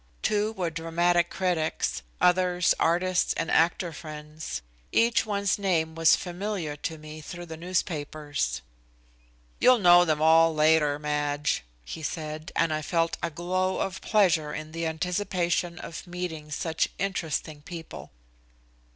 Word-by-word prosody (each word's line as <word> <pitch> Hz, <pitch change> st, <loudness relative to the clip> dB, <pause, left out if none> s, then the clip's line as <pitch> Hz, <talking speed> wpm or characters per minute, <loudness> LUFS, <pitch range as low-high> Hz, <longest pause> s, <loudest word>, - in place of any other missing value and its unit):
Two 210 Hz, +1 st, +1 dB
were 180 Hz, -5 st, -2 dB
dramatic 170 Hz, +1 st, +1 dB
critics, 170 Hz, -, -1 dB, 0.2 s
others 180 Hz, 0 st, +3 dB
artist 180 Hz, +2 st, +2 dB
and -, -, -1 dB
actor 170 Hz, +1 st, +2 dB
friends. 150 Hz, -, -7 dB, 0.3 s
Each 230 Hz, -1 st, +3 dB
one's 200 Hz, -1 st, 0 dB
name 165 Hz, -5 st, +1 dB
was 165 Hz, 0 st, +5 dB
familiar 180 Hz, -3 st, -4 dB
to 160 Hz, +2 st, -4 dB
me 155 Hz, 0 st, -10 dB
through 175 Hz, +3 st, -8 dB
the 160 Hz, -1 st, -7 dB
newspapers. 150 Hz, -, -2 dB, 1.0 s
"You'll 255 Hz, 0 st, +6 dB
know 175 Hz, -4 st, +7 dB
them 155 Hz, -3 st, +1 dB
all 160 Hz, +1 st, +5 dB
later, 155 Hz, -1 st, +4 dB
Madge," 150 Hz, -, -1 dB, 0.2 s
he 160 Hz, -, -7 dB
said, 155 Hz, 0 st, -5 dB
and 165 Hz, -2 st, +2 dB
I 155 Hz, -, -1 dB
felt 165 Hz, +2 st, 0 dB
a 170 Hz, -, -1 dB
glow 185 Hz, +3 st, -1 dB
of 190 Hz, -1 st, -3 dB
pleasure 175 Hz, -8 st, +2 dB
in 155 Hz, 0 st, -6 dB
the 165 Hz, 0 st, -2 dB
anticipation 175 Hz, +1 st, -1 dB
of 170 Hz, -, -8 dB
meeting 175 Hz, -4 st, -5 dB
such 160 Hz, +1 st, -1 dB
interesting 160 Hz, -5 st, -3 dB
people. 165 Hz, +1 st, -9 dB
165 Hz, 135 wpm, -27 LUFS, 155-180 Hz, 1.0 s, know